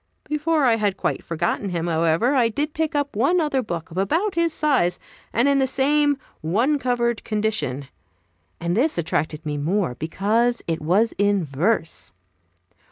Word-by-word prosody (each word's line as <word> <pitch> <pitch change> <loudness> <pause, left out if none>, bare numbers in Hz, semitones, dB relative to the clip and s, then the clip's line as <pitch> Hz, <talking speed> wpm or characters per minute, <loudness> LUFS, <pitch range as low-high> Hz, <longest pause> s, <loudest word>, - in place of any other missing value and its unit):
Before 300 0 0
I 230 -2 +4
had 205 -3 0
quite - - -2
forgotten 170 +4 -2
him, 170 -2 -2
however, 165 - +2
I 245 -4 +3
did 295 +6 -2
pick 320 0 -1
up 285 -4 -1
one 280 - +3
other 295 -5 +1
book 170 -7 -5
of 175 - -3
about 335 - +1
his 335 -1 +1
size, 275 - +1 0.3
and 235 +5 +2
in 280 -1 +3
the 265 - +2
same 290 +2 +2 0.2
one 235 - +1
covered 240 -3 0
condition; 210 - -2 0.7
and 170 +1 -1
this 290 +8 +2
attracted 155 -1 -2
me 150 -1 -2
more, 170 +1 0
because 215 - 0
it 165 -1 -2
was 195 +9 +2
in 205 -2 +2
verse. 160 - -1
220 Hz, 165 wpm, -23 LUFS, 170-280 Hz, 0.7 s, I